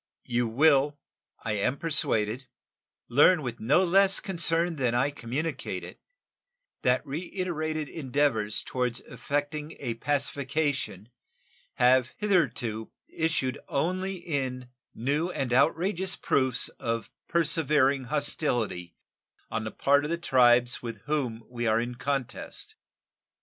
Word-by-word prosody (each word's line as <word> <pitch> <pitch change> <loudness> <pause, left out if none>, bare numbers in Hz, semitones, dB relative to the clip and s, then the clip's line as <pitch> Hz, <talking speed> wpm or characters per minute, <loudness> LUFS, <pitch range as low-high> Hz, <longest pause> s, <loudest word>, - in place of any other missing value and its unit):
You 120 0 0
will, 145 +3 +3 0.5
I 110 - -2
am 105 +6 0
persuaded, 130 -6 0 0.6
learn 150 +6 +5
with 125 -3 -5
no 140 +11 +3
less 195 +2 +5
concern 170 -2 0
than 125 -3 +1
I 130 +4 +2
communicate 140 +5 -4
it - - -10 0.8
that 125 +1 +2
reiterated 155 -1 -3
endeavors 135 -8 0
toward 125 -2 -1
effecting 150 +2 -3
a 115 - -2
pacification 140 - -1 0.7
have 125 0 +4
hitherto 125 - 0 0.2
issued 155 -5 -1
only 185 +5 -1
in 130 -7 -4 0.2
new 145 +8 0
and 135 -8 -2
outrageous 180 +7 +2
proofs 130 -3 +1
of 115 -1 -3 0.2
persevering 145 -5 +2
hostility 120 - 0 0.6
on 110 -1 -2
the 110 - -4
part 140 +1 +3
of 150 - -3
the 170 - 0
tribes 125 -5 +4
with 115 -4 -6
whom 130 -6 -2
we 120 -1 -3
are 110 +1 +3
in 120 +1 -3
contest. 135 0 -4
140 Hz, 115 wpm, -28 LUFS, 120-160 Hz, 0.8 s, learn